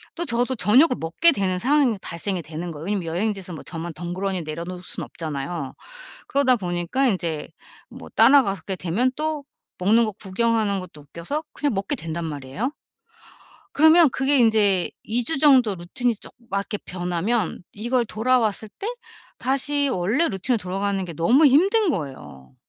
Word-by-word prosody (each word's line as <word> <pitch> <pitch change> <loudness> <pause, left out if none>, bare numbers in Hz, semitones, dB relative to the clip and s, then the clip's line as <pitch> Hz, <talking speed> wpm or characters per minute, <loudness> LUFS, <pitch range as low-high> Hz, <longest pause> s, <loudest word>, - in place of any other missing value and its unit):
또 345 0 -3
저도 245 +1 +1
저녁을 250 - +4
먹게 170 - +3
되는 190 -7 0
상황이 265 -3 +2
발생이 180 +2 -3
되는 165 +2 -6
거예요. 155 +1 -8
왜냐하면 200 -4 -2
여행지에서 190 +1 -2
뭐 155 - -8
저만 165 -1 -6
덩그러니 180 +2 -3
내려 155 +2 -5
놓을 180 0 -7
수는 - - -3
없잖아요. 145 -2 -5 0.6
그러다 265 -3 +3
보니까 175 +7 -1
인제 170 -7 -2 0.4
뭐 - - -11
따라가게 195 - +3
되면 195 +10 0
또 305 -2 -2 0.3
먹는 220 +6 +4
거 215 - -2
구경하는 210 +1 0
것도 165 -5 -11
웃겨서 170 - -5
그냥 290 -6 -1
먹게 200 +9 -2
된단 165 -3 -5
말이에요. 150 - -4 1.0
그러면 315 +1 +7
그게 270 +3 +2
인제 210 -6 +3
2 235 +2 -1
주 320 +3 0
정도 260 -8 +5
루틴이 225 +7 -1
좀 - - -10 0.2
맞게 200 +1 -2
변하면 180 +3 -2
이걸 240 +3 0
돌아왔을 220 -2 0
때 405 - -4 0.5
다시 280 +2 +1
원래 230 - +1
루틴으로 215 +5 -1
돌아가는 195 +1 -2
게 170 - -7
너무 245 - +4
힘든 385 - +4
거예요. 130 - -5
205 Hz, 345 characters per minute, -23 LUFS, 175-255 Hz, 1.0 s, 그러면